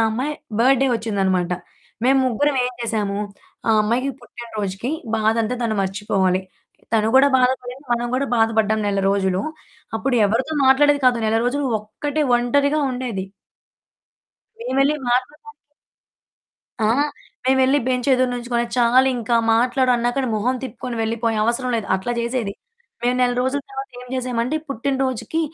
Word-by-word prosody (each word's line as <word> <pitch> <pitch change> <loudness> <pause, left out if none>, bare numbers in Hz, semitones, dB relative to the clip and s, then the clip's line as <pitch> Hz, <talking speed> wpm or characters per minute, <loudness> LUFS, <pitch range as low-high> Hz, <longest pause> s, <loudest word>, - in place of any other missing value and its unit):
అమ్మాయి 260 +7 -2 0.3
బడ్డే 265 +2 +4
వచ్చిందన్నమాట. 195 -5 0 0.6
మేము 270 +1 +5
ముగ్గురం 280 +4 +1
ఏం - - -3
జేసాము 215 -4 -1 0.5
ఆ - - +5
అమ్మాయికి 240 +6 0
పుట్టిన 240 0 -11
రోజుకి, 200 +4 -3 0.3
బాధంతా 220 +2 +1
తను 225 -2 0
మర్చిపోవాలి. 190 -1 0 0.5
తను 220 -1 +3
కూడా 270 +1 +7
బాధ 250 0 +4
పడింది 250 +3 -10
మనం 240 0 0
గూడా 275 +2 0
బాధ 225 -1 +4
పడ్డాం 220 0 +2
నెల 200 -1 0
రోజులు. 190 -2 +1 0.6
అప్పుడు 250 +4 -1
ఎవరితో 245 +9 -1
మాట్లాడేది 285 +2 +5
కాదు. 245 -2 +4
నెల 220 +1 +2
రోజులు 275 +3 0
ఒక్కటే 290 +8 -3
ఒంటరిగా 280 +5 +1
ఉండేది. 245 -7 -3 1.4
మేమేళ్లి 275 - +1
మాట్లడదాం 290 - -1 1.3
ఆ! 215 - +2 0.6
మేమేళ్లి 265 +1 +4
బెంచ్ 250 0 0
ఎదురు 255 -1 +2
నించుకొని, 240 -1 -1
చాలింకా 245 -1 +3 0.2
మాట్లాడు 250 +2 +2
అన్నాక 240 +2 -1 0.2
మొహం 240 +5 0
తిప్పుకొని 245 0 -6
వెళ్ళిపోయే 225 0 -1
"అవసరం 240 +2 0
లేదు" 220 - -3
అట్లా 190 +6 -2
జేసేది. 235 -3 -2 0.5
మేము 245 +1 +1
నెల 250 -1 +3
రోజుల 260 +3 0
తర్వాత 270 0 -6
ఏం 250 - -11
చేసామంటే, 250 +2 -1
పుట్టినరోజుకి 270 +3 -1
245 Hz, 135 wpm, -21 LUFS, 220-265 Hz, 1.4 s, కూడా